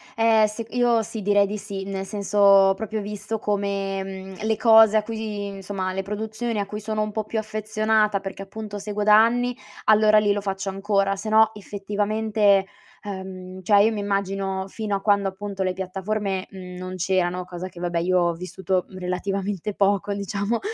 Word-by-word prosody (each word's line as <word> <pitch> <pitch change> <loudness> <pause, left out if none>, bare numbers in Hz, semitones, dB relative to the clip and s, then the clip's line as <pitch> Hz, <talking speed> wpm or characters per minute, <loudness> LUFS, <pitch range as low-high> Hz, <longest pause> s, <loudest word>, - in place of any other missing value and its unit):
Eh, 225 -1 +4
sec 220 +2 -6
io 240 -2 +3
sì, 220 0 -6
direi 205 0 +4
di 210 +2 -4
sì, 200 -2 -6
nel 195 0 -4
senso 205 0 -4
ho 195 -1 +7
proprio 220 +1 -4
visto 210 +2 -5
come, 200 -2 -1
mhmm, 190 +1 -8
le 220 0 +1
cose 220 -1 +7
a - - +3
cui 225 +1 -6
di 210 -2 -4
insomma, 195 -1 -4
le 190 +1 -3
produzioni 220 +2 -3
a 200 - -2
cui 210 +1 -5
sono 215 0 -2
un 215 0 -2
po' 220 +1 -2
più 220 +1 -3
affezionata, 215 -1 0
perché 195 0 -7
appunto 205 +1 -7
seguo 205 +1 -4
da 210 0 +6
anni, 240 +2 +3 0.3
allora 215 0 +6
lì 205 -1 +2
lo 205 - +1
faccio 195 0 -3
ancora. 195 0 0
Sennò, 220 +2 +4
effettivamente, 205 0 +1 0.3
ehm, 190 -2 -7
cioè 200 +2 +5
io 225 - +3
mi 210 -2 -3
immagino, 195 -1 -2
fino 210 0 -3
a 195 - -3
quando, 200 -1 +2
appunto, 195 0 -5
le 185 -1 0
piattaforme, 190 +1 -3
mhmm, 180 -1 -9
non 185 0 -6
c'erano, 180 0 0
cosa 180 0 -6
che 180 -2 -12
vabbè 175 -1 -2
io 180 +2 +2
ho 175 -1 +2
vissuto, 180 +1 -2
mhmm, 185 - -11
relativamente 195 +2 -3
poco 200 0 +1
diciamo, 200 +3 -2
200 Hz, 190 wpm, -24 LUFS, 190-215 Hz, 0.3 s, ho